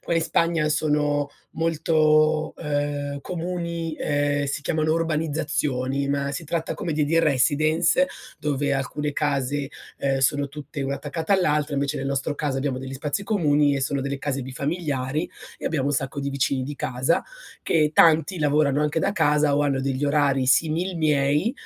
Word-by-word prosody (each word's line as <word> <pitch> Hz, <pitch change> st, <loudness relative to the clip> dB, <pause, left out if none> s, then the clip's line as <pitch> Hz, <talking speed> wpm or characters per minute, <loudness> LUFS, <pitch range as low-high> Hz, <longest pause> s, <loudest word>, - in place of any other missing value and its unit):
qua 170 Hz, -, -2 dB
in 165 Hz, -, +3 dB
Spagna 165 Hz, -1 st, +1 dB
sono 150 Hz, -1 st, +1 dB, 0.2 s
molto, 155 Hz, -1 st, +2 dB
ehm, 145 Hz, -2 st, -2 dB
comuni, 170 Hz, -2 st, -4 dB
uhm, 145 Hz, 0 st, 0 dB
si 140 Hz, +1 st, -3 dB
chiamano 155 Hz, +1 st, +1 dB
urbanizzazioni, 150 Hz, -4 st, -1 dB
ma 140 Hz, 0 st, 0 dB
si 145 Hz, +4 st, -5 dB
tratta 165 Hz, +1 st, -2 dB
come 170 Hz, -6 st, -3 dB
de 150 Hz, 0 st, +1 dB
dei 165 Hz, +3 st, +2 dB
residence 155 Hz, -, +3 dB, 0.3 s
dove 145 Hz, -1 st, -1 dB
alcune 145 Hz, +2 st, -2 dB
case, 140 Hz, -1 st, -1 dB, 0.3 s
Uhm, 135 Hz, -1 st, +1 dB
sono 140 Hz, +2 st, +2 dB
tutte 145 Hz, 0 st, -7 dB
una 135 Hz, 0 st, -1 dB
attaccata 160 Hz, +4 st, -3 dB
all'altra, 150 Hz, -6 st, +2 dB
invece 140 Hz, +1 st, -1 dB
nel 135 Hz, 0 st, -3 dB
nostro 140 Hz, +2 st, -1 dB
caso 140 Hz, -3 st, -1 dB
abbiamo 135 Hz, -1 st, -2 dB
degli 130 Hz, +1 st, -7 dB
spazi 145 Hz, +8 st, -3 dB
comuni 150 Hz, -8 st, +2 dB
e 140 Hz, -, -1 dB
sono 135 Hz, +1 st, -1 dB
delle 140 Hz, 0 st, -3 dB
case 140 Hz, -2 st, -2 dB
bifamiliari 140 Hz, +1 st, -2 dB, 0.3 s
e -, -, -11 dB
abbiamo 140 Hz, -4 st, 0 dB
un 145 Hz, -, +1 dB
sacco 135 Hz, +1 st, -2 dB
di 140 Hz, 0 st, -2 dB
vicini 135 Hz, -1 st, 0 dB
di 145 Hz, +3 st, -5 dB
casa 130 Hz, +5 st, 0 dB, 0.4 s
che 155 Hz, -2 st, +2 dB
tanti 165 Hz, +3 st, +5 dB
lavorano 145 Hz, -1 st, +2 dB
anche 150 Hz, +1 st, 0 dB
da -, -, +1 dB
casa 150 Hz, -5 st, +2 dB
o 145 Hz, -, +2 dB
hanno 140 Hz, -2 st, +1 dB
degli 135 Hz, +1 st, -1 dB
orari 140 Hz, -2 st, +2 dB
simil 165 Hz, +7 st, +2 dB
miei. 150 Hz, -, +2 dB
145 Hz, 165 wpm, -24 LUFS, 140-155 Hz, 0.4 s, tanti